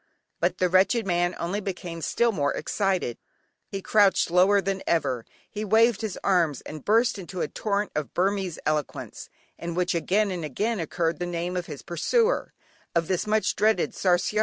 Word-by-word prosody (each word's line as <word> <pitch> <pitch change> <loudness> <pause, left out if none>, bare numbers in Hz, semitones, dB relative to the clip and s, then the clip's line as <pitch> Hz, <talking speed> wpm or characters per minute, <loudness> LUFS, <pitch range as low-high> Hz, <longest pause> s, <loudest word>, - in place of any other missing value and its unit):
But - - +1
the 185 - +2
wretched 195 +5 +3
man 175 -1 +1
only 185 +5 -2
became 175 -4 -5
still 235 +7 +2
more 145 -8 0
excited, 190 - -1 0.5
he 195 -1 -6
crouched 200 -5 +3
lower 190 +3 +5
than 195 0 -2
ever, 135 -8 0 0.2
he 210 - -5
waved 225 +2 +4
his 215 -4 -3
arms, 170 -8 +2
and 155 -2 -9
burst 230 +1 +3
into 185 -1 -6
a - - 0
torrent 205 -1 -2
of 150 -2 -4
Burmese 190 -2 0
eloquence, 150 -2 -3 0.3
in 170 0 -4
which 180 0 +1
again 195 +5 +1
and 175 -3 -4
again, 205 - -1
occurred 165 0 -1
the 175 - -2
name 175 +1 -3
of 180 -1 -3
his 150 -3 -8
pursuer, 450 - +1 0.4
of 165 -1 +2
this 185 +2 0
much 215 0 +1
dreaded 215 +1 +2
"Sarsiar." 185 +3 +1
185 Hz, 175 wpm, -26 LUFS, 170-205 Hz, 0.5 s, lower